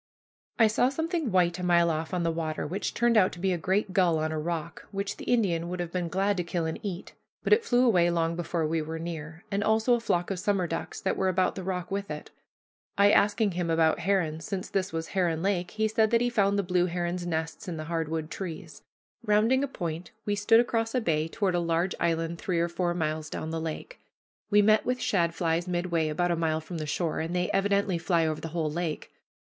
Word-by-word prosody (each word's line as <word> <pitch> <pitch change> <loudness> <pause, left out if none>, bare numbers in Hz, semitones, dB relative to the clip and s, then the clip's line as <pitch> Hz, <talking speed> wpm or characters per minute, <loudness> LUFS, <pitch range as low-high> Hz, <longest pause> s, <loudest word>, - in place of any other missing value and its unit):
I 225 - +6
saw 220 +4 +3
something 320 - -2
white 180 -1 +2
a - - -4
mile 170 -1 +4
off 160 0 -3
on 180 -2 -1
the 165 - +1
water, 160 -1 -3
which 185 +7 -3
turned 235 -1 +3
out 185 -3 +5
to 175 - -9
be 190 +1 +1
a - - -1
great 190 +3 0
gull 180 -4 +3
on 155 0 -1
a 155 - -2
rock, 165 0 -4
which 200 0 -4
the - - -8
Indian 175 -8 +1
would 180 0 -4
have 175 -1 -3
been 180 -1 -2
glad 195 +3 0
to 180 - 0
kill 170 0 -2
and 160 - -3
eat. 195 -4 -6 0.3
But - - +4
it 445 +2 +4
flew 245 - +3
away 180 -7 +4
long 165 -1 0
before 170 -1 -1
we 160 +1 0
were 160 +1 -5
near; 160 -1 -6
and 200 +1 0
also 220 +3 +3
a 240 - +3
flock 175 -5 0
of 190 - -2
summer 195 -1 +1
ducks 165 0 -4
that 190 - -1
were 190 - +1
about 185 0 +1
the 190 - -6
rock 180 -1 -4
with 200 0 -3
it. 150 0 -7 0.7
I 200 +1 +6
asking 205 0 +3
him 175 -1 -2
about 160 0 +3
herons, 170 -4 0
since 185 +4 -4
this 195 0 -1
was 160 0 -4
Heron 170 -3 0
Lake, 185 -3 0
he 220 0 0
said 220 0 +2
that 235 - +3
he 245 0 +1
found 200 -3 +2
the 200 - +1
blue 180 -1 +1
heron's 175 0 -2
nests 160 +4 -3
in 170 -3 -4
the 155 - -4
hard 165 -1 -2
wood 160 0 -3
trees. 175 -4 -7 0.4
Rounding 225 +5 +3
a - - 0
point, 170 - -5 0.2
we 205 - 0
stood 210 +3 +4
across 230 0 0
a 250 - +2
bay 160 -6 0
toward 190 +2 -1
a 175 - +2
large 170 +2 0
island 165 0 0
three 180 -3 -1
or 170 +1 +1
four 175 0 -1
miles 155 -2 -2
down 160 - -5
the 165 0 -2
lake. 165 - -6 0.5
We 205 0 +5
met 215 +1 +4
with 250 0 0
shadflies 170 -3 0
midway, 175 -2 0
about 175 +3 0
a - - +2
mile 160 -1 0
from 160 +1 -7
the 155 - -4
shore, 160 +2 -1
and 165 +2 -3
they 180 0 0
evidently 200 -2 +1
fly 165 0 +2
over 155 -1 -2
the - - -4
whole 160 -1 -2
lake. 165 -1 -3
175 Hz, 240 wpm, -28 LUFS, 165-200 Hz, 0.7 s, I